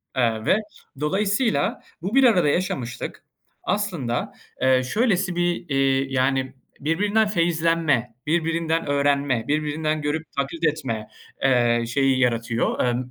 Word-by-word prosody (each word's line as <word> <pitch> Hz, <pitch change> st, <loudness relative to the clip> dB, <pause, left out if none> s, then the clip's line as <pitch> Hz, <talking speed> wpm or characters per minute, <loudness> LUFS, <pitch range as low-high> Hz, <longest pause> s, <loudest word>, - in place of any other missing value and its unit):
Eee, 115 Hz, -3 st, 0 dB
ve 195 Hz, -, +4 dB, 0.4 s
dolayısıyla, 195 Hz, -, 0 dB, 0.2 s
bu 200 Hz, +8 st, -3 dB
bir 270 Hz, -, +6 dB
arada 185 Hz, -11 st, +5 dB
yaşamışlık, 130 Hz, -8 st, -3 dB, 0.4 s
aslında, 170 Hz, -, -2 dB, 0.3 s
eee, 130 Hz, -1 st, +4 dB
şöylesi 195 Hz, -, +1 dB
bir, 175 Hz, -1 st, -1 dB
iii, 135 Hz, -1 st, +1 dB
yani, 130 Hz, 0 st, +1 dB, 0.3 s
birbirinden 205 Hz, +8 st, +1 dB
feyizlenme, 165 Hz, -, +1 dB
birbirinden 165 Hz, 0 st, 0 dB
öğrenme, 140 Hz, -4 st, +1 dB
birbirinden 155 Hz, +1 st, -1 dB
görüp 150 Hz, +2 st, -2 dB
taklit 140 Hz, +5 st, -3 dB
etme, 115 Hz, -8 st, -3 dB, 0.4 s
eee, 120 Hz, -3 st, +3 dB
şeyi 135 Hz, +1 st, +2 dB
yaratıyor, 115 Hz, -2 st, 0 dB
emm, 125 Hz, +1 st, -1 dB
145 Hz, 115 wpm, -23 LUFS, 130-170 Hz, 0.4 s, bir